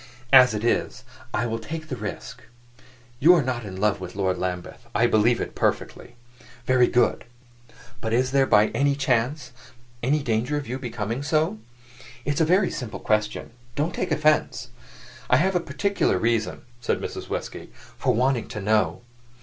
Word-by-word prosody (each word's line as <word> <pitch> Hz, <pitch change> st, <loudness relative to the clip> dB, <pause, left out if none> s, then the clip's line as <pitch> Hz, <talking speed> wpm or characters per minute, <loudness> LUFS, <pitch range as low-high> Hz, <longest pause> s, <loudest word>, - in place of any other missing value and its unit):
"As 125 Hz, -4 st, +8 dB
it 105 Hz, -, -3 dB
is, 120 Hz, -, 0 dB, 0.3 s
I 120 Hz, -, -1 dB
will 115 Hz, -1 st, -2 dB
take 155 Hz, +7 st, -7 dB
the 130 Hz, -, -4 dB
risk. 115 Hz, +3 st, -7 dB, 0.8 s
You 170 Hz, +7 st, +7 dB
are 160 Hz, -, +2 dB
not 125 Hz, -2 st, -2 dB
in 95 Hz, -2 st, -7 dB
love 105 Hz, -1 st, +1 dB
with 90 Hz, 0 st, -7 dB
Lord 95 Hz, -2 st, 0 dB
Lambeth: 90 Hz, -1 st, -5 dB
I -, -, +4 dB
believe 115 Hz, +2 st, +3 dB
it, -, -, -4 dB
perfectly. 120 Hz, -, -2 dB, 0.5 s
Very 125 Hz, -1 st, +4 dB
good. 120 Hz, -1 st, +2 dB, 0.8 s
But 110 Hz, -, -3 dB
is 125 Hz, +2 st, +1 dB
there, 135 Hz, -1 st, +3 dB
by 105 Hz, +1 st, +5 dB, 0.3 s
chance, 130 Hz, 0 st, 0 dB, 0.5 s
any 140 Hz, +4 st, +1 dB
danger 120 Hz, +5 st, 0 dB
of 145 Hz, -, -5 dB
your 125 Hz, +3 st, -4 dB
becoming 115 Hz, 0 st, -4 dB
so? 155 Hz, -5 st, 0 dB, 0.7 s
It's 145 Hz, +2 st, 0 dB
a -, -, +5 dB
very 185 Hz, +4 st, +3 dB
simple 125 Hz, -7 st, -6 dB
question; 105 Hz, +1 st, -1 dB, 0.2 s
don't 155 Hz, +4 st, -1 dB
take 180 Hz, -1 st, -3 dB
offense. 155 Hz, 0 st, +1 dB, 0.6 s
I 125 Hz, -, +5 dB
have 185 Hz, +6 st, +1 dB
a -, -, +4 dB
particular 175 Hz, -, 0 dB
reason," 115 Hz, +2 st, -1 dB, 0.2 s
said 120 Hz, -, -1 dB
Mrs. -, -, -6 dB
Westgate, -, -, -5 dB
"for -, -, -3 dB
wanting 125 Hz, 0 st, +1 dB
to 110 Hz, -, -6 dB
know." 105 Hz, 0 st, +1 dB
125 Hz, 165 wpm, -24 LUFS, 110-145 Hz, 0.8 s, As